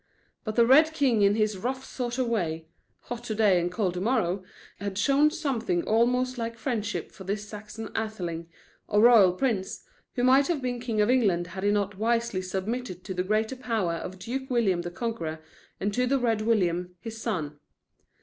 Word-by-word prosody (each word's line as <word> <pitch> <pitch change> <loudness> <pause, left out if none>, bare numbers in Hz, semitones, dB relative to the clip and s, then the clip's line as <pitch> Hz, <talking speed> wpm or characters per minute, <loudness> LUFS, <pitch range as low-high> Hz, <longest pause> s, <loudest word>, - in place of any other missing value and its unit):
But 215 -2 -4
the 235 - +5
Red 305 +6 +6
King 265 -8 +2
in 200 0 +4
his 215 -3 0
rough 260 +4 -3
sort 245 -1 -4
of 260 - +1
way 165 -9 -1 0.4
hot 240 -1 -7
to 220 - -3
day 205 -5 +4
and 175 +1 -2
cold 185 -2 0
to 180 - -4
morrow 195 -5 0 0.4
had 200 -1 -4
shown 280 +7 +4
something 255 - -1
almost 250 +3 +1
like 230 0 -4
friendship, 210 - -3
for 190 - -11
this 205 +2 -3
Saxon 215 +1 -8
Atheling, 175 -7 -3 0.4
or 210 0 +3
royal 225 -6 +7
prince, 200 -2 -2 0.3
who 245 - 0
might 265 +2 +5
have 340 -4 0
been 250 -2 -3
king 230 -3 -1
of 210 +4 +3
England 200 -9 +2
had 190 0 -5
he 205 - +3
not 205 -1 0
wisely 230 -3 0
submitted 190 +1 -4
to 190 - -5
the 180 - -1
greater 215 +6 0
power 225 -9 -1
of 180 +3 -6
Duke 255 +8 -5
William 210 -8 +2
the 175 - -5
Conqueror 175 -5 -4 0.4
and 205 +1 -1
to 250 +3 +1
the 275 +2 +2
Red 230 -4 +1
William, 180 -5 0
his 225 -1 -7
son. 155 -11 -3
215 Hz, 190 wpm, -27 LUFS, 185-245 Hz, 0.4 s, royal